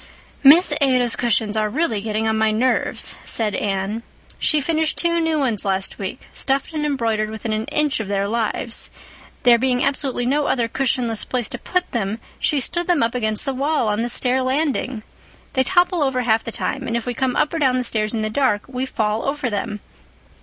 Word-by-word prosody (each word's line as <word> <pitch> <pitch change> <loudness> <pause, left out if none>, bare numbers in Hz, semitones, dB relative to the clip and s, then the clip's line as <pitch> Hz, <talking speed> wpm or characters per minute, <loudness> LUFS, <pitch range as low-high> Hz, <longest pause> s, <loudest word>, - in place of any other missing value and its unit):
"Miss 310 +7 +7
Ada's 255 -3 +3
cushions 220 -3 0
are 215 -1 +1
really 230 -5 -1
getting 220 +1 -1
on 220 - +1
my 220 0 +2
nerves," 235 +4 0
said 215 -3 -1
Anne. 200 +2 -2 0.4
"She 305 - +2
finished 315 +1 0
two 340 0 +3
new 325 -1 +1
ones 245 -8 0
last 195 -1 -1
week, 195 +5 -6
stuffed 275 +3 -1
and 305 -1 -2
embroidered 225 -6 0
within 220 0 -4
an 215 +1 -2
inch 300 -1 0
of 220 - -4
their 200 0 0
lives. 230 +1 0 0.5
There 240 -1 +6
being 255 0 +1
absolutely 265 -3 -1
no 285 +3 +1
other 235 -3 +1
cushionless 240 -3 0
place 245 -3 -2
to 245 - -5
put 365 +6 -2
them 215 -2 -2 0.2
she 295 - +1
stood 345 +6 -1
them 345 -8 +3
up 230 - 0
against 220 -2 -1
the 270 - -1
wall 275 -3 0
on 210 +1 0
the 240 - -1
stair 255 +2 +2
landing. 260 -3 -1 0.5
They 260 - +2
topple 360 +1 +2
over 265 -3 +1
half 225 -1 +2
the 230 - -5
time 265 +3 -3
and 230 0 0
if 235 - -5
we 245 - -2
come 255 +1 -1
up 300 - +1
or 330 - -1
down 260 -3 +3
the 250 - 0
stairs 215 -2 0
in 220 - -1
the 215 - -1
dark 215 -5 +1
we 260 0 -3
fall 215 -2 -1
over 275 -4 -2
them. 210 0 -3
245 Hz, 205 wpm, -21 LUFS, 220-275 Hz, 0.5 s, Miss